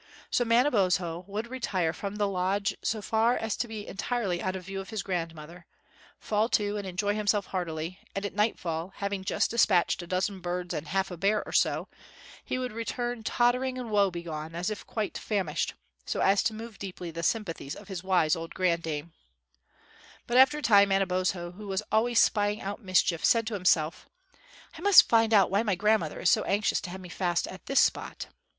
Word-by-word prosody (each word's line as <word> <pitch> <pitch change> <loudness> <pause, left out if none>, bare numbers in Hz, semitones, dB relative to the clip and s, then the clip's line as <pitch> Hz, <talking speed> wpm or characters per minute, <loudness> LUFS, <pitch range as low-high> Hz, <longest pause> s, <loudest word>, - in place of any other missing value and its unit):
So 245 - +2
Manabozho 190 - +2
would 210 +3 -3
retire 205 -10 -1
from 200 +4 -5
the 205 -1 +1
lodge 195 +1 0
so 215 -2 -2
far 225 +3 +2
as 225 -2 -2
to 240 - -2
be 215 -2 -6
entirely 200 -4 -2
out 185 0 -2
of 185 - -6
view 195 0 -5
of 195 - -11
his 220 - -3
grandmother, 165 -1 -5 0.5
fall 215 +2 0
to 205 -3 +1
and 200 -2 -5
enjoy 200 +3 -1
himself 205 -1 +1
heartily, 175 -1 -4 0.2
and 195 +1 -2
at 200 - -4
nightfall, 185 -4 -1
having 200 -1 -3
just - - 0
despatched 190 -7 +3
a 175 - -9
dozen 185 +2 -1
birds 180 0 -3
and 150 - -4
half 190 +2 -1
a 180 - -6
bear 205 +4 +1
or - - -8
so, - - +1 0.6
he - - -3
would 255 -1 -3
return 240 +1 -3
tottering 250 +3 +1
and 245 -3 -5
woe 200 -2 +4
begone, 165 -2 -6
as 180 +5 -2
if 210 - -7
quite 215 -2 -3
famished, 190 -8 -2 0.3
so - - -3
as 195 0 +4
to 220 - 0
move 225 -1 -9
deeply 180 -3 -6
the 165 +1 -5
sympathies 170 -7 -2
of - - -12
his 190 -3 -6
wise 180 -4 +3
old 165 0 -7
granddame. 170 -3 -1 1.1
But 240 - +1
after 265 +3 +6
a - - -5
time 200 -2 +6
Manabozho, 185 -2 0
who 205 +3 -10
was 195 +1 -2
always 230 +2 +3
spying 205 0 +2
out 200 +4 -5
mischief, 185 -4 +1
said 230 -1 +4
to 220 - -4
himself, 180 -4 +1 0.7
"I 320 - -10
must 405 +1 +8
find 225 -1 +3
out 200 -4 +5
why 200 +2 +3
my 210 -4 0
grandmother 210 -4 +1
is - - +3
so - - +4
anxious 205 +1 +1
to 185 - -7
have 190 +1 -7
me 180 - -10
fast 175 -1 0
at 185 - -11
this 275 - +3
spot." - - 0
195 Hz, 195 wpm, -28 LUFS, 180-220 Hz, 1.1 s, must